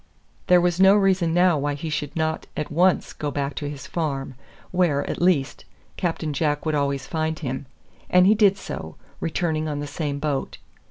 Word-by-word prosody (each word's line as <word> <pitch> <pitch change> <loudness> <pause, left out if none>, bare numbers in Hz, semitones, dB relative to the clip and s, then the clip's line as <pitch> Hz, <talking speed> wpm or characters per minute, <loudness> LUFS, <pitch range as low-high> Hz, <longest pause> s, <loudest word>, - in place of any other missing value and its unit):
There 180 0 +6
was 175 0 +1
no 190 +1 +7
reason 190 -4 +2
now 175 -2 +4
why 145 +1 -1
he 155 +2 -5
should 145 -1 -3
not 160 -1 -1
at 150 - -3
once 180 +4 +2
go 150 - -3
back 140 0 -2
to 145 0 -3
his 145 -2 -8
farm, 140 -5 -3 0.4
where, 175 -6 +1
at - - -4
least, 170 -7 +1 0.3
Captain 165 -4 -2
Jack 150 +1 0
would 155 - 0
always 140 -2 0
find 160 +1 -2
him; 135 -2 -5 0.4
and 180 0 +5
he 205 - +6
did 205 -2 +4
so, 80 - -7 0.2
returning 160 -1 -1
on 145 -1 -3
the 145 - -3
same 145 -1 -3
boat. 140 -2 -2
155 Hz, 185 wpm, -24 LUFS, 145-175 Hz, 0.4 s, no